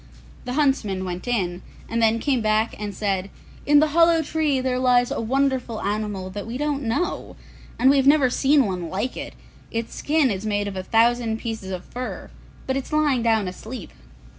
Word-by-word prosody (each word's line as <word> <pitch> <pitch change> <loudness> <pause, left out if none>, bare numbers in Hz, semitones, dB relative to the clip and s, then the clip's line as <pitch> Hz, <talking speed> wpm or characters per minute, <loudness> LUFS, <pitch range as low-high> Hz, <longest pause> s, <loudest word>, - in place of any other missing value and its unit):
The 250 - -3
huntsmen 250 -10 +1
went 180 +4 -5
in, 185 -7 -1 0.3
and 230 0 -1
then 225 0 +4
came 260 0 0
back 215 +1 +1
and 205 -2 -5
said, 195 -2 -1 0.4
'In 295 0 +6
the 305 +1 +3
hollow 330 +1 +4
tree 305 -3 0
there 255 -1 -1
lies 245 -1 +3
a - - -2
wonderful 260 -1 0
animal 205 -2 -3
that 205 +2 -6
we 235 +2 -4
don't 290 0 -1
know, 280 +9 -2 0.4
and 255 - +3
we 280 +1 +6
have 270 0 +3
never 285 -2 +6
seen 275 +1 +3
one 180 -4 -3
like 210 +9 -2
it; - - -7 0.3
its 230 0 -4
skin 295 -4 +1
is 195 0 -3
made 205 -1 -1
of 200 - -5
a 185 - -2
thousand 230 +2 +2
pieces 225 -4 -5
of 185 -1 -5
fur; 250 0 -6 0.3
but 265 - -1
it 270 - -2
is - - -13
lying 300 -5 +2
down 225 -4 +2
asleep. 215 +3 -8
235 Hz, 195 wpm, -23 LUFS, 205-270 Hz, 0.4 s, In